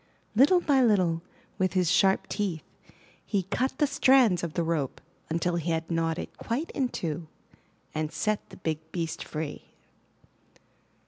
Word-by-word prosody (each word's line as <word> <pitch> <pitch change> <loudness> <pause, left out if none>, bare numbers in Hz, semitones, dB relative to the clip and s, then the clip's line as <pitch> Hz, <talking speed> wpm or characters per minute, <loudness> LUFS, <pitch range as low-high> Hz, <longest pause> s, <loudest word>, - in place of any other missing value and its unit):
Little 290 - +6
by 280 -5 +3
little, 185 -8 +3 0.4
with 185 -1 +1
his 180 -4 +2
sharp 190 0 +4
teeth, 185 -7 -2 0.6
he 200 -3 0
cut 245 +8 -1
the 300 - +4
strands 255 -10 +4
of 165 -3 -4
the 170 - +1
rope 155 -5 -1 0.3
until 170 +2 0
he 170 0 -2
had 165 0 -1
gnawed 165 0 0
it - - -6
quite 260 +8 -2
in 265 -4 0
two, 165 -6 -4 0.7
and 155 0 -2
set 215 +3 -1
the - - -12
big 160 -3 -2
beast 165 -3 -3
free. 155 -1 -6
175 Hz, 150 wpm, -28 LUFS, 165-225 Hz, 0.7 s, Little